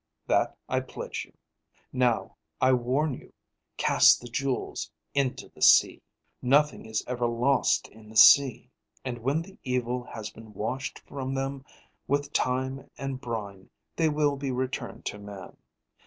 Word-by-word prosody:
That - - +1
I - - +1
pledge - - -6
you. - - -27 0.6
Now, 125 -3 +1 0.2
I 130 0 +4
warn 130 +5 +1
you; - - -11 0.4
cast - - +6
the 120 - -10
jewels 130 +2 -2 0.2
into 135 -2 -1
the - - -19
sea. - - +6 0.4
"Nothing 145 +1 +2
is 110 0 -2
ever 120 -1 -1
lost 125 +3 +2
in 110 0 -16
the 110 - -6
sea, 135 -2 +7 0.3
and 120 -2 -4
when 140 +7 0
the 195 +2 -16
evil 125 -1 -1
has 110 -3 -7
been 110 -2 -14
washed 130 +7 -3
from 135 -1 -5
them 135 0 -3 0.4
with 145 +1 -1
time 130 +1 -1
and 135 -1 -4
brine, 105 -6 -6 0.3
they 160 -2 +2
will 150 -1 +1
be 135 0 -3
returned 130 0 -4
to 105 - -4
man. 100 -2 -10
130 Hz, 150 wpm, -28 LUFS, 115-140 Hz, 0.6 s, sea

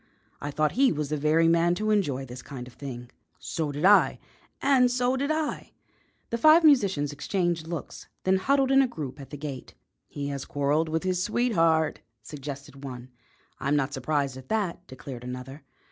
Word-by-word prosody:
I 145 - -3
thought 155 +1 +1
he 265 +1 +3
was 150 -2 -2
the 155 - 0
very 155 +3 +3
man 170 +1 +3
to 215 +3 -1
enjoy 145 -11 0
this 125 0 -9
kind 130 -4 -8
of 125 - -13
thing." 125 -3 -8 0.3
"So 155 -3 -3
did 145 +4 -2
I." 205 +1 +6 0.4
"And 265 -3 +4
so 250 +1 +1
did 280 +2 -1
I." 310 -1 -2 0.6
The 235 - -1
five 310 +5 +7
musicians 195 - +4
exchanged 170 +1 -1
looks, 165 -3 -6 0.2
then 190 0 +3
huddled 270 +6 +2
in 270 0 +6
a 265 - +3
group 150 - -7
at 135 - -11
the 145 - -7
gate. 140 -3 -7 0.3
"He 140 -1 -5
has 140 -1 -4
quarrelled 145 +3 0
with 160 +1 -1
his 185 -1 0
sweetheart," 165 -11 +2 0.2
suggested 140 +1 -8
one. 125 -2 -8 0.5
"I'm 140 +2 0
not 145 -1 0
surprised 140 -1 -1
at 130 0 -12
that," 190 -5 -2
declared 130 -2 -9
another. 125 +3 -7
155 Hz, 180 wpm, -27 LUFS, 140-205 Hz, 0.6 s, five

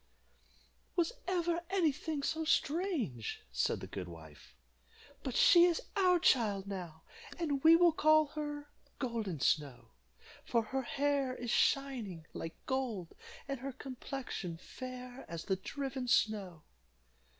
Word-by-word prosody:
"Was 345 +3 +1
ever 345 -2 +1
any 365 -5 +3
thing 300 +1 -4
so 320 +2 0
strange?" 300 - 0
said 65 +1 0
the - - -5
good 95 -2 -6
wife. 80 -3 -13 0.7
"But 260 - -4
she 345 -1 +8
is 345 -2 +2 0.2
our 365 -3 +5
child 215 - +3
now, 180 -5 -6 0.3
and 290 -6 -1
we 325 +1 +9
will 345 0 +6
call 310 0 +5
her 295 -1 -5 0.3
Golden 225 - -2
Snow, 140 0 0 0.5
for 235 -2 +1
her 265 +5 -2
hair 275 0 0
is 240 -3 -4
shining 235 - +1
like 165 - -5
gold, 240 -10 -2 0.3
and 275 -2 -3
her 275 +2 -4
complexion 255 - -6
fair 255 +5 -8
as 165 -1 -5
the 190 - +1
driven 265 +6 -4
snow." 200 -9 +1
260 Hz, 130 wpm, -34 LUFS, 195-305 Hz, 0.7 s, we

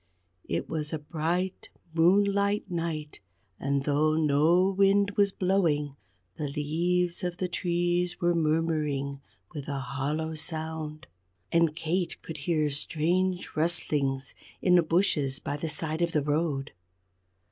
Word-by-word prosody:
It 85 - -2
was 155 -2 -2
a 160 - -1
bright 170 +5 -2 0.2
moonlight 200 +4 +3
night, 165 -3 -3 0.4
and 140 0 0
though 150 +2 +2
no 160 +5 +4
wind 200 +1 +3
was 200 -1 +4
blowing, 165 -8 +1 0.4
the 150 - -2
leaves 170 +5 0
of 180 -1 -2
the 185 - -1
trees 175 0 0
were 175 0 +2
murmuring 155 -4 0 0.3
with 145 -2 -6
a 140 -1 -2
hollow 140 +5 -2
sound. 155 -1 -5 0.5
And 165 -2 +3
Kate 170 +2 -1
could 160 - -6
hear 155 -3 +2
strange 175 +5 -1
rustlings 145 -5 0 0.3
in 180 - +3
the 175 - +7
bushes 155 -5 +1
by 145 - -3
the 160 +2 -3
side 155 +2 -2
of 170 -1 +1
the 150 - +2
road. 145 -2 -1
160 Hz, 130 wpm, -28 LUFS, 150-175 Hz, 0.5 s, the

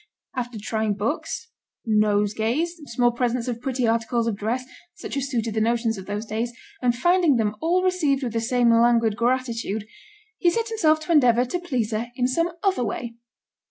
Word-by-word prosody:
After 245 -2 -4
trying 220 0 -1
books, 285 - -3 0.3
nosegays, 215 +7 +1 0.2
small 240 +1 +2
presents 240 0 -1
of 235 -2 -3
pretty 255 -1 -1
articles 230 +1 +1
of 230 -3 0
dress, 230 +5 -2 0.3
such - - -7
as 275 -1 -2
suited 230 -4 -1
the 220 - 0
notions 230 0 +1
of 190 -2 -9
those 205 +2 -3
days, 225 +3 -2 0.3
and 245 -1 +2
finding 345 +2 +3
them 215 -2 0
all 355 +3 +2
received 305 -7 +1
with 240 -3 -3
the 230 - 0
same 240 0 +3
languid 230 -2 +4
gratitude, 235 -3 -1 0.5
he 350 - +4
set 460 +5 -1
himself 315 -9 +3
to 310 - -4
endeavour 250 -6 +5
to 355 +8 -3
please 255 -11 -2
her 220 +2 -2
in 250 -1 +1
some 335 +7 +1
other 385 -10 +2
way. 235 +1 -4
240 Hz, 180 wpm, -24 LUFS, 225-275 Hz, 0.5 s, endeavour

